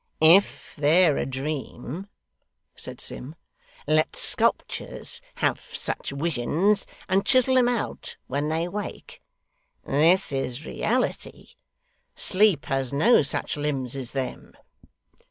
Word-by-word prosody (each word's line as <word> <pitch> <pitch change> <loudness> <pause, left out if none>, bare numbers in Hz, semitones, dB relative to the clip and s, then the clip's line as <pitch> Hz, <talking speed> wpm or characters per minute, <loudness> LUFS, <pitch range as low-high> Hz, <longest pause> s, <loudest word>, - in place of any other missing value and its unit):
'If 170 +6 +4
they're 155 +1 +4
a - - -1
dream,' 140 +4 -5 0.7
said - - -4
Sim, 145 +6 -5 0.5
'let 155 +1 +2
sculptures - - 0
have - - 0
such - - -2
wisions, 165 - 0 0.2
and 190 +1 +2
chisel 260 0 +4
'em 250 -1 +4
out 240 -3 -4
when 145 +3 -2
they 165 +2 -1
wake. 205 +3 -7 0.6
This 165 +6 +3
is 135 +1 -3
reality. 250 +10 -2 0.7
Sleep 195 -5 +2
has 135 -2 -1
no 160 +13 +5
such 140 - -2
limbs 140 -4 -2
as 130 -3 -6
them. 135 -2 -5
155 Hz, 110 wpm, -25 LUFS, 135-195 Hz, 0.7 s, no